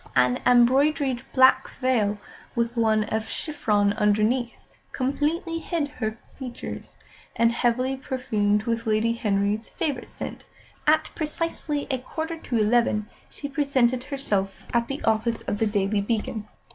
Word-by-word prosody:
An 125 0 +3
embroidered 260 +2 +4
black 260 0 +5
veil, 225 -6 +2 0.4
with 235 0 0
one 220 -2 +3
of 220 +1 -3
chiffon 210 -10 0
underneath, 215 +4 +1 0.4
completely 300 +5 -1
hid 325 -3 -2
her 220 -6 -4 0.2
features; 250 -3 -7 0.4
and, 230 0 +4
heavily 250 +2 +1
perfumed 215 -6 0
with 230 0 -2
Lady 220 +2 +2
Henry's 210 0 0
favourite 275 -5 -3
scent, - - -7 0.4
at 310 +1 +3
precisely 310 -2 -2
a 260 - 0
quarter 320 +6 -4
to 245 -6 -2
eleven 215 -1 +2 0.2
she 285 - -6
presented 260 -3 +1
herself 210 -9 -1
at 235 -1 +2
the 275 +1 -5
office 225 +1 +1
of 205 - -3
The 225 - +2
Daily 205 0 +1
Beacon. 215 0 -2
235 Hz, 135 wpm, -25 LUFS, 215-275 Hz, 0.4 s, black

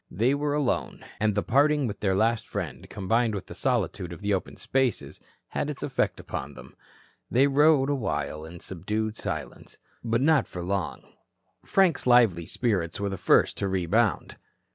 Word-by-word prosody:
They 115 +9 +1
were 145 0 0
alone, 145 -5 -1
and 105 -1 +1
the 105 - +1
parting 145 +2 +3
with 105 -3 -4
their 95 -2 +1
last 110 +2 +1
friend, - - -5
combined 110 +3 0
with 100 - -5
the - - -9
solitude 90 -2 -1
of 85 - -9
the 100 0 0
open 95 - -3
spaces, 130 -5 -1 0.3
had - - -2
its - - -6
effect - - -1
upon 70 +1 -6
them. - - -13 0.5
They 130 +3 +4
rode 140 0 +4
awhile 120 - -2
in 85 +2 -10
subdued 105 +5 -3
silence. - - -6 0.3
But 115 +1 0
not 150 -2 +3
for 90 - -6
long. 95 +2 -2 0.6
Frank's 185 -9 +2
lively 115 -9 +4
spirits 100 -9 -1
were 100 0 -1
the 95 - -3
first - - +3
to 100 - 0
rebound. 95 +2 0
110 Hz, 165 wpm, -26 LUFS, 95-135 Hz, 0.6 s, They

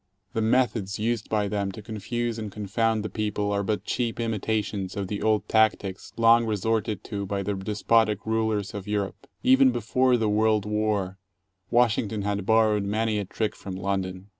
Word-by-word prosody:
The 115 - 0
methods 110 -4 +1
used 115 0 -1
by 105 -2 +1
them 100 -1 -1
to 110 - -8
confuse 115 +2 -3
and 105 -2 -5
confound 110 +2 0
the - - 0
people 105 -1 -1
are 100 0 +1
but 105 +1 -1
cheap 120 -2 -2
imitations 105 -4 -2
of 100 -2 -2
the 105 - -3
old 110 -1 +1
tactics 105 -3 +1
long 115 0 +5
resorted 110 -1 -1
to 100 -3 -4
by 100 0 -2
the 100 +1 -1
despotic 105 +2 +1
rulers 110 -3 0
of 100 -1 -6
Europe. 105 +5 -3 0.2
Even 265 +1 +6
before 130 - +2
the 110 -2 0
world 105 0 +2
war 105 -3 -1 0.5
Washington 110 -3 +2
had 100 -1 -2
borrowed 110 -2 +4
many 110 +1 0
a 100 - -3
trick 110 +3 -2
from 95 -2 -7
London. 95 0 -3
105 Hz, 170 wpm, -26 LUFS, 100-110 Hz, 0.5 s, Even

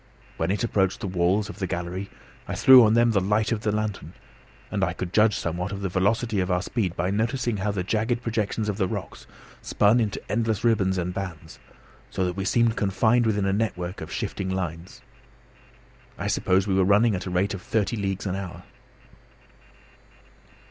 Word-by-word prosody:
When 80 - -1
it 100 +4 0
approached 95 -5 +1
the - - -3
walls 90 +3 +1
of 105 - -10
the 95 - -2
gallery 90 +3 -4 0.4
I - - -3
threw 130 -2 +8
on 110 0 +4
them 120 0 +4
the 100 -3 +2
light 105 +4 +1
of 110 -2 -1
the 105 - 0
lantern, 105 -6 -3 0.6
and - - -1
I - - 0
could 90 -1 -6
judge 105 -1 +4
somewhat 90 +3 -3
of 100 -1 -5
the 95 - -2
velocity 105 +4 0
of 90 0 -1
our 90 0 +1
speed 100 -6 -2
by 90 +3 -1
noticing 115 +2 -1
how 100 +2 -1
the 100 -3 -2
jagged 115 +5 -1
projections 110 -1 -2
of 105 -2 -2
the 95 -3 +1
rocks - - -6 0.3
spun 105 +4 +3
into 110 -3 -1
endless 110 -2 -1
ribbons 100 -5 +2
and 90 0 -2
bands, 85 -4 -7 0.5
so 95 - -1
that 90 -1 -2
we 95 0 -3
seemed 115 0 +2
confined 110 +4 +2
within 105 -2 +1
a 95 - +1
network 95 -4 -2
of - - -7
shifting 95 -1 -3
lines. 95 +6 -5 1.1
I - - -5
supposed 95 -2 +1
we 100 - 0
were 95 0 +3
running 105 +4 +4
at 90 - -2
the - - -5
rate 95 +4 0
of 95 - -6
thirty 110 +4 -1
leagues 95 -2 -3
an 95 -1 -2
hour. 90 -2 -7
100 Hz, 195 wpm, -25 LUFS, 95-110 Hz, 1.1 s, threw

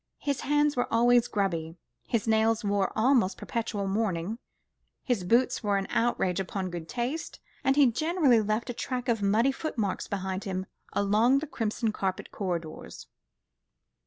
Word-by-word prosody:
His 280 -2 -2
hands 295 0 +2
were 245 - -1
always 240 +1 +4
grubby, 170 -5 -2 0.3
his 230 -2 -1
nails 220 0 +2
wore 200 -1 +1
almost 225 -5 +3
perpetual 225 -3 -3
mourning, 195 0 -1 0.6
his 245 -8 0
boots 245 +7 +2
were 205 -2 +1
an 195 - -1
outrage 195 -6 +1
upon 190 0 -3
good 170 -2 -6
taste, 255 +7 -3 0.2
and 270 - +3
he 290 -1 +6
generally 280 -1 +3
left 215 +3 -1
a - - -6
track 250 +1 -4
of 230 -3 +1
muddy 215 +6 +3
foot 310 +2 -5
marks 200 -4 -1
behind 190 -1 -3
him 190 -1 -3 0.3
along 215 +6 +3
the 290 - -1
crimson 225 -5 -2
carpeted 190 -3 -3
corridors. 170 -5 -5
220 Hz, 155 wpm, -28 LUFS, 195-245 Hz, 0.6 s, he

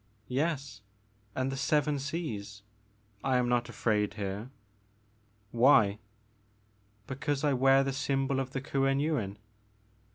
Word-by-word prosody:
"Yes, 140 -5 -1 0.5
and 130 +1 -1
the - - -3
seven 150 +1 +1
seas. 110 -9 -5 0.6
I 130 -1 +2
am 125 -1 +1
not 120 0 +1
afraid 105 -4 0
here." 100 +3 -4 1.0
"Why?" 115 -4 +5 1.1
Because 135 +3 -2
I 145 -2 +3
wear 135 +1 +5
the 135 0 -2
symbol 135 -1 0
ot 130 - -4
the 135 0 -4
Kuen 135 0 +1
Yuin." 130 -10 -1
135 Hz, 120 wpm, -30 LUFS, 115-140 Hz, 1.1 s, Why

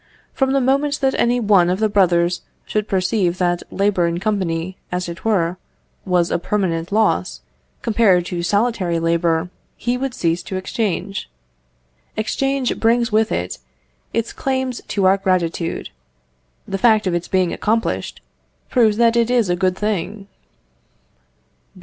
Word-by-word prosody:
From 265 -1 +1
the 275 - +3
moment 280 +3 +1
that 265 -1 +2
any 245 +1 +2
one 200 -6 +4
of 180 - +1
the 215 - +3
brothers 180 -4 +2 0.2
should 215 0 -2
perceive 185 -2 0
that 175 -1 +1
labour 195 -3 +1
in 170 0 -2
company, 185 -4 -1 0.2
as 180 0 -2
it 170 +1 -8
were, 180 -5 +1 0.5
was 180 -2 +1
a - - +1
permanent 175 -3 -1
loss, 220 +1 +1 0.4
compared 205 -6 +3
to 175 -1 -3
solitary 200 -2 +1
labour, 165 +1 +1 0.3
he 245 +1 -1
would 270 -1 -3
cease 170 0 0
to 195 - -6
exchange. 195 - -3 0.9
Exchange 270 +4 -1
brings 235 +1 +2
with 215 +1 +2
it 90 +1 -3 0.5
its 230 +1 -2
claim 260 -1 -1
to 205 -5 -2
our 190 +1 +5
gratitude. 180 -3 -1 0.8
The 195 - -3
fact 220 -1 +4
of 185 - 0
its 175 0 -2
being 185 -2 +1
accomplished, 225 +2 -1 0.5
proves 220 -5 +3
that 235 0 +4
it 235 0 +2
is 235 -7 +2
a - - +2
good 185 0 0
thing. 210 -1 -2
195 Hz, 145 wpm, -20 LUFS, 175-230 Hz, 0.9 s, our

